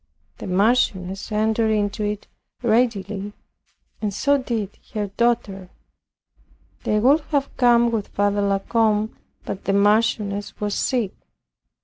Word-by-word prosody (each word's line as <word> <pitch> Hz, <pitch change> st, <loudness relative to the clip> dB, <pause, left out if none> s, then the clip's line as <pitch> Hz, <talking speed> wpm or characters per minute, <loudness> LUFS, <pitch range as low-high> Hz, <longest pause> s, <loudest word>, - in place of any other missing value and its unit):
The -, -, -6 dB
Marchioness 195 Hz, -1 st, +1 dB
entered 220 Hz, +1 st, +1 dB
into 210 Hz, 0 st, 0 dB
it 210 Hz, 0 st, -3 dB, 0.4 s
readily, 210 Hz, -4 st, 0 dB, 0.7 s
and 210 Hz, -2 st, -1 dB
so 280 Hz, +8 st, +2 dB
did 225 Hz, -6 st, -4 dB, 0.2 s
her 205 Hz, -2 st, -1 dB
daughter. 205 Hz, -6 st, 0 dB, 1.2 s
They 210 Hz, -, +2 dB
would 270 Hz, +8 st, +5 dB
have 280 Hz, -2 st, -1 dB
come 240 Hz, -1 st, +4 dB
with 220 Hz, -3 st, -2 dB
Father 205 Hz, 0 st, 0 dB
La 200 Hz, -1 st, +2 dB
Combe, 215 Hz, +1 st, +1 dB, 0.3 s
but 195 Hz, -, -6 dB
the 195 Hz, -, +1 dB
Marchioness 205 Hz, 0 st, +1 dB
was 205 Hz, -1 st, -2 dB
sick. 235 Hz, -6 st, 0 dB
210 Hz, 120 wpm, -22 LUFS, 200-230 Hz, 1.2 s, would